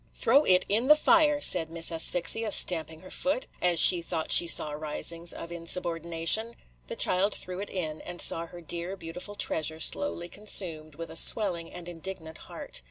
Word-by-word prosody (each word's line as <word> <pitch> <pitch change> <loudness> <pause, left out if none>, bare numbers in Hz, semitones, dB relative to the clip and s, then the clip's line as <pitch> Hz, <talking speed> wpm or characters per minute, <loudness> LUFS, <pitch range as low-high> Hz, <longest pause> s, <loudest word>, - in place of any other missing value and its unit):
"Throw 275 +6 +2
it 180 -1 +4
in 225 +5 0
the 300 - +7
fire," 305 -1 +2
said 170 - +3
Miss 165 0 -2
Asphyxia, 180 +6 +1
stamping 160 -4 +2
her 185 - -14
foot, 270 -1 -2 0.2
as 175 -2 +3
she 175 0 +6
thought 165 -1 -5
she 170 - +7
saw 155 -2 +2
risings 155 +3 -4
of 170 - -8
insubordination. 170 +5 0 0.3
The - - -6
child 195 +3 +1
threw 180 0 -6
it 205 - -7
in, 160 -5 -5
and 175 0 -9
saw 165 0 0
her 175 +1 -13
dear, 170 +3 -5
beautiful 180 +4 -9
treasure 160 -5 -1
slowly 175 - -1
consumed, 170 -6 -2
with 165 +2 -9
a - - -10
swelling 175 -3 +2
and 175 -1 -10
indignant 165 -2 -8
heart. - - -6
175 Hz, 175 wpm, -26 LUFS, 165-195 Hz, 0.3 s, the